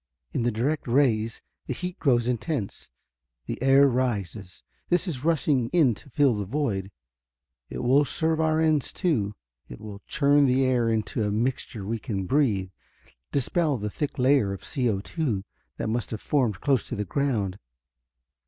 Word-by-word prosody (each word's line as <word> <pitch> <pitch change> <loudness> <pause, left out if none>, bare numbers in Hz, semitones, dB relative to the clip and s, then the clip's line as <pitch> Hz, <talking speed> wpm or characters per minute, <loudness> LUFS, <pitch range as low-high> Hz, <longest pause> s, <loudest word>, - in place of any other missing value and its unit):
In - - 0
the 120 +1 +1
direct 130 +8 -1
rays 115 -4 +1 0.2
the 130 - -2
heat 180 +4 -5
grows 120 -5 +2
intense; 125 -2 -3 0.6
the - - -5
air 135 +1 +6
rises. 105 -7 -2 0.3
This 180 +2 +2
is 140 -7 -3
rushing 150 -6 +2
in 155 -9 +4
to 125 - -14
fill 140 0 +3
the 105 -1 -3
void. 105 -6 -2 0.8
It - - -5
will 135 +4 +5
serve 160 +3 0
our 160 0 +2
ends, 155 -3 +2
too. 110 - 0 0.3
It - - -9
will 105 -2 -9
churn 145 0 +4
the 130 +1 +3
air 125 -3 +2
into 110 0 -1
a 105 - 0
mixture 110 -1 -2
we 115 +3 -2
can 100 -5 -3
breathe, 105 -7 +1 0.6
dispel 145 +2 +1
the 105 -1 -4
thick 150 +5 -3
layer 130 -6 +3
of 100 - -8
CO_2 120 - -1 0.3
that - - -3
must 115 +1 -2
have 110 - -4
formed 120 -10 0
close 135 -7 +1
to - - -4
the 105 - -2
ground." 105 -5 -1
125 Hz, 160 wpm, -26 LUFS, 105-145 Hz, 0.8 s, air